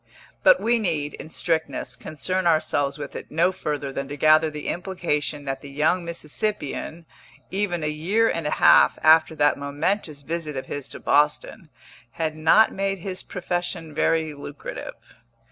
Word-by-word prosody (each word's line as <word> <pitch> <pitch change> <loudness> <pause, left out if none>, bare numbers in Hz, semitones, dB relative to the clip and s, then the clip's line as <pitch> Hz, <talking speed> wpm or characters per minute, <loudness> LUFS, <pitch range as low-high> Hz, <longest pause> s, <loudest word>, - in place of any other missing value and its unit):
But - - +6
we 235 +1 +2
need, 155 -8 0
in - - -9
strictness, 160 -6 -2
concern 175 +7 -2
ourselves 145 -3 +1
with 145 -2 -7
it - - -7
no 170 +4 +2
further 150 -6 -4
than 140 0 -4
to 145 +1 -6
gather 155 +2 +5
the 150 -1 -6
implication 150 -6 -2
that 135 -1 -3
the 140 - -10
young 155 +6 +1
Mississippian, 170 0 -4 0.5
even 190 -4 -1
a - - 0
year 180 +10 +1
and 165 -7 -1
a - - -1
half - - +6
after 160 0 +5
that 145 -1 +3
momentous 145 +2 -2
visit 155 -1 -4
of 130 - -4
his 145 -2 -6
to - - -7
Boston, 150 +1 +1 0.4
had 160 -1 -2
not 160 +8 +4
made 195 0 -1
his 185 +1 -4
profession 175 -3 -4
very 160 -1 +1
lucrative. 145 0 -9
155 Hz, 160 wpm, -24 LUFS, 145-175 Hz, 0.5 s, But